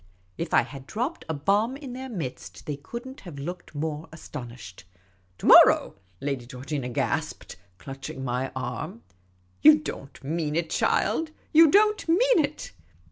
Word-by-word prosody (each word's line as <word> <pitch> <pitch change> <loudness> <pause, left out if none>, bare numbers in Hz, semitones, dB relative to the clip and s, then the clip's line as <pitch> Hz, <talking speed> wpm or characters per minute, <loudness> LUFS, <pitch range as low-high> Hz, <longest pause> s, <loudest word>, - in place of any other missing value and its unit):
If 170 - -4
I - - +5
had 135 -2 -10
dropped 250 +10 -3
a - - 0
bomb 205 - +1
in 275 -4 -8
their 260 +1 -6
midst 155 - -6
they 150 - -3
could 235 - -8
n't 265 +2 -10
have 170 -6 -10
looked 170 +3 -7
more 155 +1 -4
astonished. 120 - -9 0.2
' 95 0 -36
' 90 0 -38
To - - -8
morrow? - - +7
' 90 - -36
' 90 - -36
Lady 135 -4 -3
Georgina 125 +1 -4
gasped, 120 - -3 0.2
clutching 135 +1 -7
my 125 +1 -2
arm. 125 -2 -5 0.3
" 90 0 -37
You 155 +7 +9
don't 140 -3 -8
mean 155 +1 -2
it, 165 -1 -1
child; 320 -1 +1 0.2
you 320 0 +8
don't 425 0 +3
mean 470 +5 +4
it 290 +1 -5
150 Hz, 175 wpm, -26 LUFS, -, 0.3 s, You